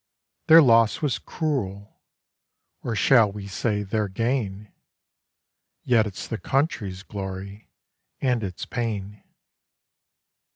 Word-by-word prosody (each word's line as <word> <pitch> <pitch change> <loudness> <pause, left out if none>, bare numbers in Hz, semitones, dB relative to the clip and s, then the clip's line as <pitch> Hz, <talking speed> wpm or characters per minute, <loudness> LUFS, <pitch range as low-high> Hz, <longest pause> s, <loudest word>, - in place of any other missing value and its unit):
Their 160 0 +9
loss 115 +2 +4
was 140 -5 0
cruel, 110 - -4 0.8
or 115 - -3
shall 110 -1 +5
we 100 0 -8
say 105 +1 -1
their 105 +1 -1
gain, 105 -1 -2 1.1
Yet 115 -3 +3
it's 95 -3 -7
the 115 - -4
country's 110 - -1
glory, 100 0 -7 0.5
and 125 -4 +1
its 90 -3 -5
pain.' 105 -4 -4
105 Hz, 100 wpm, -24 LUFS, 100-120 Hz, 1.1 s, Their